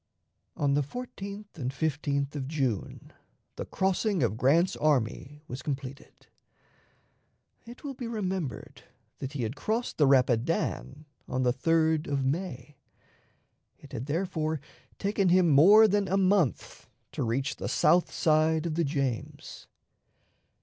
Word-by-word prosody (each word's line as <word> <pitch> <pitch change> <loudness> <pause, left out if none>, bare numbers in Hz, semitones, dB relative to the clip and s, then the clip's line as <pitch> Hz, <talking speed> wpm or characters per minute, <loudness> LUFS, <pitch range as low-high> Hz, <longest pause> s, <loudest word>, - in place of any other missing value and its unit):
On 140 -1 +1
the 145 - +3
14th 200 - -7
and 130 -4 -2
15th 140 0 -2
of 135 -3 -4
June 135 -9 -3 0.4
the - - -5
crossing 190 - 0
of 110 -3 0
Grant's 150 +10 +3
army 145 +1 -1
was 125 +2 -6
completed. 135 -1 -7 1.4
It 240 +5 -12
will 280 -2 -5
be 245 -2 -6
remembered 190 - -4 0.4
that 135 +1 -5
he 135 -4 -3
had 110 +4 -3
crossed 220 - -2
the 145 - +5
Rapidan 135 +3 +1 0.2
on 130 0 -1
the 125 -1 +2
3d 160 +2 +1
of 140 -2 -1
May. 145 -3 -3 1.0
It - - -16
had 125 - -5
therefore 160 -1 -1 0.4
taken 200 -2 +1
him 180 -1 +4
more 200 +10 +8
than 205 -1 +1
a 195 - +1
month 190 - 0 0.2
to - - -5
reach 130 +3 -1
the - - -4
south 175 0 +3
side 155 0 +2
of 165 - -2
the 170 +2 +1
James. 135 -6 -4
155 Hz, 135 wpm, -28 LUFS, 135-185 Hz, 1.4 s, more